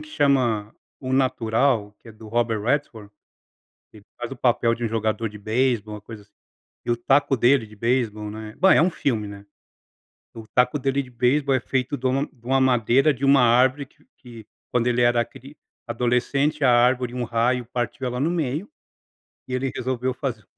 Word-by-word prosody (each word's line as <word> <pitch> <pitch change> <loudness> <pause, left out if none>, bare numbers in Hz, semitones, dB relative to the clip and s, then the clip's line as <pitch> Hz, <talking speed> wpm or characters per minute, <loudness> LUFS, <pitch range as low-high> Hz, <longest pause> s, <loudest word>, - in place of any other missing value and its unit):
que 310 - -12
chama 125 - +1 0.3
O 130 -2 -4
Natural, 120 -4 +1
que 115 - -17
é - - -11
do 110 0 -13
Robert 115 -1 0
Redford, 115 -5 -2 0.8
que - - -15
ele 100 - -18
faz 120 +1 -6
o 135 - -5
papel 120 -1 +1
de 120 - -5
um - - +1
jogador 110 0 -1
de 105 - -11
beisebol, 110 0 -1
uma 105 - -10
coisa 105 -1 -11
assim. 105 - -31 0.5
E - - 0
o 120 - +2
taco 135 +3 +2
dele 120 0 +3
de 105 - -15
beisebol, 110 -2 -1
né, 110 0 -9
bem, 190 +1 +5
é - - +5
um 175 - +3
filme, 115 - -2
né. 100 0 -11 0.9
E - - -11
o 110 - -10
taco 125 +3 +2
dele 135 +1 0
de 125 - -14
beisebol 130 +4 +1
é 130 - +1
feito 130 +5 -2
de 130 - -4
uma 135 +3 +1
de 120 -4 -27
uma 135 +1 +2
madeira 130 +3 +3
de 140 +2 -5
uma 135 -1 +5
árvore 130 +4 +3
que - - -29
que 115 -4 -13 0.3
quando 125 0 +1
ele 125 0 +1
era 120 -1 +3
cri 140 +4 -15 0.3
adolescente 125 +5 0
a 125 - +5
árvore 125 0 +2
um 125 -1 -2
raio 120 +2 0
partiu 125 +2 -4
ela 125 0 -3
no 150 +6 0
meio, 160 +1 -2 0.8
e 130 - -9
ele 130 +1 -1
resolveu 130 0 -2
fazer 120 -7 -5
125 Hz, 200 wpm, -23 LUFS, 115-135 Hz, 0.9 s, bem